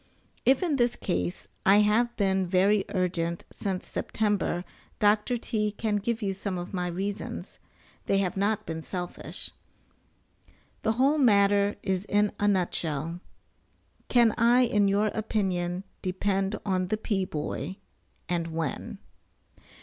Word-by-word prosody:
If 265 +6 +5
in 315 -6 +1
this 240 -1 +2
case 90 +1 -2 0.2
I 200 +2 +6
have 235 +3 +2
been 190 -2 +2
very 195 +3 +3
urgent 170 -3 -1
since 190 -2 -3
September 205 -4 -1 0.3
Dr. 210 +4 +3
T. 215 -2 -1
can 210 0 -1
give 225 +2 -2
you 195 -1 0
some 190 -1 -3
of 175 +2 -6
my 180 -1 -1
reasons, 195 +3 -4 0.5
they 195 - +3
have 190 -2 0
not 205 +2 0
been 160 0 -4
selfish. 175 +1 -5 1.3
The 220 - +1
whole 275 +6 +3
matter 200 -4 +4
is 190 0 -1
in 205 0 +2
a 205 - +2
nutshell. 170 -4 -1 0.9
Can 235 -3 +5
I, 240 +2 +5
in 210 -5 +3
your 205 +2 +2
opinion, 185 -4 -1 0.2
depend 195 +2 0
on 185 -2 0
the 215 +3 0
"P. 205 -3 -1
Boy," 160 +1 -4 0.5
and 170 -1 -1
when? 160 -2 -3
200 Hz, 135 wpm, -28 LUFS, 180-215 Hz, 1.3 s, I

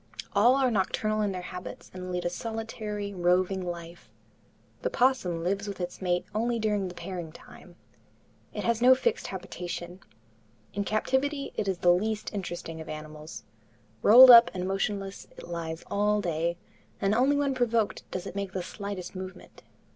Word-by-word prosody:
All 235 +6 +5
are 265 -2 +2
nocturnal 215 +1 0
in 205 -1 +1
their 180 -1 -5
habits 180 0 -8
and 185 0 -6
lead 180 0 -2
a - - +2
solitary, 215 -1 -5
roving 185 +1 +1
life. 170 -1 -7 0.7
The - - 0
opossum 245 - +1
lives 200 +3 -1
with 200 -1 -6
its 180 +1 -5
mate 180 -1 0
only 235 +2 0
during 210 -3 0
the 180 - -8
pairing 175 -2 -6
time. - - -15 0.8
It - - -5
has 235 -1 +1
no 255 +1 +8
fixed 465 - -1
habitation. 180 -1 -6 0.7
In 200 0 -2
captivity 270 +7 0
it 210 - -2
is 190 -2 0
the 175 0 +5
least 215 +4 -2
interesting 175 -4 -5
of 160 - -9
animals. 155 0 -8 0.6
Rolled 250 +4 +10
up 235 0 +10
and 180 0 -2
motionless, 195 0 -3
it - - -10
lies 165 -1 -5
all 210 +1 +1
day, 170 -2 -1 0.4
and 195 +1 +1
only 260 +5 +3
when 285 -1 +1
provoked 235 -4 0
does 185 0 -5
it 195 - -7
make 200 -1 -4
the 185 - -2
slightest 200 -1 -6
movement. 185 0 -9
195 Hz, 165 wpm, -28 LUFS, 180-220 Hz, 0.8 s, Rolled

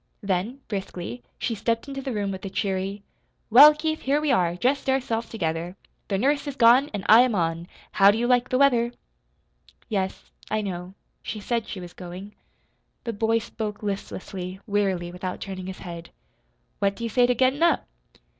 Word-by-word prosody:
Then, 200 +8 -2
briskly, 180 - -5 0.2
she 235 - -2
stepped 230 +4 -1
into 275 -1 -5
the 270 -1 -4
room 205 -3 -2
with 190 -1 -7
a 195 - -4
cheery: 195 +1 -2 0.5
"Well, 290 +6 +10
Keith, 315 +1 -2
here 280 +2 +1
we 300 -2 +1
are, 175 -8 +2
just 265 +8 0
ourselves 240 -4 0
together. 170 -3 -3 0.3
The 195 - 0
nurse 285 +7 +1
is 285 - -4
gone 250 +4 +6
an' 205 -2 -5
I 225 +2 +9
am 250 -3 +2
on 165 -1 -1 0.2
how 195 0 +6
do 205 - +3
you 235 - 0
like 245 0 +2
the 255 - +1
weather?" 245 -3 +3 1.0
"Yes, 190 -3 -3 0.2
I 215 +1 0
know, 185 -2 -5 0.3
she 215 - -5
said 230 +2 -2
she 195 - -6
was 175 -1 -9
going." 185 +3 -9 0.7
The 230 - -3
boy 225 +2 +1
spoke 220 -2 -5
listlessly, 190 -2 -5
wearily, 195 -4 0
without 180 +1 -5
turning 185 -2 -6
his 190 - -6
head. 170 -2 -8 0.7
"What 200 0 +1
do 235 - -8
you 230 - -1
say 245 +2 +4
to 250 - +2
gettin' 260 +4 +2
up?" 340 0 +3
210 Hz, 185 wpm, -25 LUFS, 185-245 Hz, 1.0 s, Well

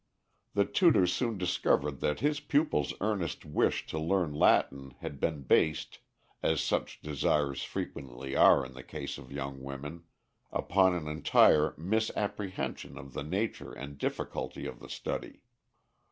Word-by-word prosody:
The 100 - +4
tutor 165 - +4
soon 115 +4 0
discovered 75 -6 +1
that 75 - -1
his 150 0 +2
pupil's 145 - +1
earnest 100 -5 -1
wish 75 - +1
to 80 - -4
learn 85 -1 +1
Latin 70 -2 +2
had 70 - -6
been 75 -4 -1
based 80 +4 +2 0.4
as 80 -2 +2
such - - -1
desires 75 -2 0
frequently 65 +1 -5
are 70 - +6
in 65 - -10
the 65 - -9
case - - -6
of - - -13
young 70 -1 -5
women 70 +5 -7 0.5
upon 95 -1 +3
an 80 -3 -3
entire 75 0 +4
misapprehension 105 +1 -2
of 70 -1 -10
the - - -4
nature 95 +9 -2
and 70 +1 -8
difficulty - - -3
of - - -6
the - - -12
study. - - -5
75 Hz, 140 wpm, -31 LUFS, 70-95 Hz, 0.5 s, are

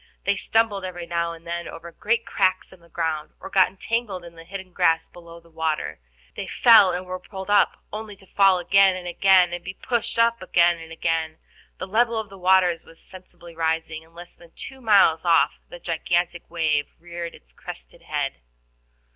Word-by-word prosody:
They 200 - +1
stumbled 215 -2 0
every 175 -2 -6
now 170 0 -2
and 165 0 -14
then 170 0 -4
over 170 +1 -9
great 230 +6 -1
cracks 185 -1 0
in 190 - -17
the 170 0 -22
ground, 160 -2 -3
or - - -10
got 190 -2 +5
entangled 195 -2 -3
in 170 - -12
the 165 0 -13
hidden 190 0 -9
grass 165 -1 +2
below 170 -1 -13
the 170 0 -23
water. 160 - -2 0.4
They - - -5
fell, 220 -6 +6
and 180 +1 -4
were 185 0 -5
pulled 190 +1 -7
up 205 - +3
only 215 -1 -6
to 195 - -19
fall 195 -1 +4
again 195 +1 +4
and 180 -1 -7
again, 180 0 +4
and 175 0 -5
be 190 +1 -7
pulled 235 +1 -2
up 230 0 +3
again 170 -1 +3
and 165 0 -11
again. 160 -1 -2 0.4
The - - -5
level 230 +3 +1
of 220 - -6
the 195 -1 -13
waters 180 -2 +3
was 165 - -17
sensibly 175 -2 -14
rising, 160 -1 -2
and 165 +1 -24
less 175 +1 -11
than 170 -1 -19
two 265 -1 -10
miles 200 -8 +4
off 165 -5 +3
the - - -9
gigantic 175 +1 -2
wave 155 -3 0
reared 170 0 -7
its - - -19
crested - - -11
head. - - -3
175 Hz, 195 wpm, -23 LUFS, 165-195 Hz, 0.4 s, fell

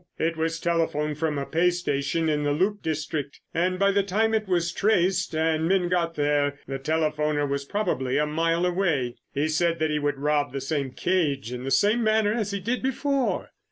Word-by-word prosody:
It 165 +1 0
was 165 0 -1
telephoned 155 -3 0
from 155 -2 0
a 140 - -2
pay 170 +4 +2
station 165 -2 -1
in 150 -1 +1
the 145 0 +1
loop 200 +7 0
district, 155 -2 -3
and 180 +2 +1
by 200 +1 +3
the 200 0 +3
time 215 +3 +1
it 215 -2 0
was 170 -2 +1
traced 185 -4 +1
and 160 0 +1
men 185 -1 +2
got 170 -2 0
there, 145 -1 +1
the 135 0 -4
telephoner 150 0 0
was 140 0 -2
probably 140 -9 -1
a 150 - +2
mile 165 +3 +1
away. 175 -10 0
He 145 +2 0
said 165 +2 +1
that 155 -1 0
he 150 - 0
would 145 -1 -1
rob 145 -1 0
the 140 - -2
same 140 -1 -2
cage 140 -4 -1
in 125 0 -5
the - - -2
same 205 - +3
manner 215 -1 +3
as 220 -3 -1
he 200 -1 -3
did 235 +7 -2
before." 270 0 -1
160 Hz, 200 wpm, -25 LUFS, 145-185 Hz, -, by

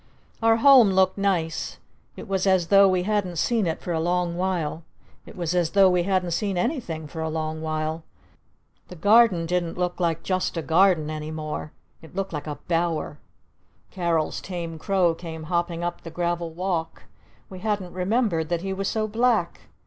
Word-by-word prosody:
Our 225 0 +5
Home 250 -3 +7
looked 190 +1 +2
nice. 175 -5 -1 0.4
It - - -9
was 195 0 0
as 185 -3 +2
though 200 0 +7
we 185 -1 +1
hadn't 200 -3 -1
seen 220 +3 +1
it 160 - -3
for 175 - -4
a 160 - 0
long 175 +1 0
while. 175 -4 -2 0.5
It - - -11
was 170 -1 -2
as 175 -3 +1
though 195 -2 +6
we 180 -1 +2
hadn't 185 -1 0
seen 195 +2 -1
anything 180 - -2
for 160 +2 -7
a 160 - -2
long 155 0 -3
while! 155 0 -3 0.8
The 180 - -10
Garden 205 -1 +4
didn't 175 0 -2
look 180 0 -2
like 165 -2 0
Just 185 -2 -1
a 165 - -2
Garden 165 -2 +3
any 155 0 -5
more! 155 -1 -5 0.3
It 160 - -15
looked 195 -2 -3
like 150 0 -5
a 150 - -4
Bower! 165 -3 -1 0.7
Carol's 170 -4 -1
tame 170 -3 -6
crow 185 -1 +2
came 165 -1 -8
hopping 170 +1 -2
up 175 0 -3
the 165 - -8
gravel 170 0 -2
walk! 170 -1 -3 0.4
We 185 - -10
hadn't 205 -3 -2
remembered 185 -3 0
that 170 0 -1
he 195 0 -2
was 195 0 -3
so 215 0 -1
black! 225 -5 0
175 Hz, 180 wpm, -24 LUFS, 165-195 Hz, 0.8 s, Home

